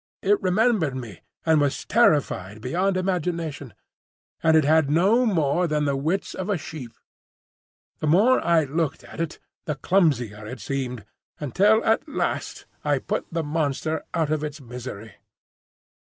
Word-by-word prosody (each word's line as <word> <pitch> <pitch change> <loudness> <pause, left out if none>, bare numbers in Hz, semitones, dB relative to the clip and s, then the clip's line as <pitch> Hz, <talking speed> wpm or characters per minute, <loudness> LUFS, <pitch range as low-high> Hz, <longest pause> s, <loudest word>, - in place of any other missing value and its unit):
It 205 +1 +3
remembered 190 - +2
me, 120 -8 -7 0.3
and 160 -2 +4
was 145 -1 -1
terrified 135 - +2
beyond 185 - 0
imagination; 170 - -2 0.7
and 160 -1 +5
it 155 - +4
had 155 0 +3
no 200 +11 +3
more 170 -3 +1
than 150 -1 0
the 140 -1 +1
wits 160 +8 -1
of 190 +2 -5
a 200 - +1
sheep. 145 -6 -8 1.1
The 155 - -2
more 210 +12 +4
I 170 -2 +4
looked 155 +1 -2
at - - -7
it 165 -1 -3 0.3
the 150 - -2
clumsier 125 - +1
it 125 +3 -7
seemed, 125 -5 -4 0.3
until 205 - +3
at 225 +8 +1
last - - -3 0.2
I - - +2
put - - -3
the 165 -1 -1
monster 155 0 -1
out 160 -2 0
of 155 -1 0
its 150 0 -5
misery. 120 -4 -8
155 Hz, 150 wpm, -24 LUFS, 135-180 Hz, 1.1 s, and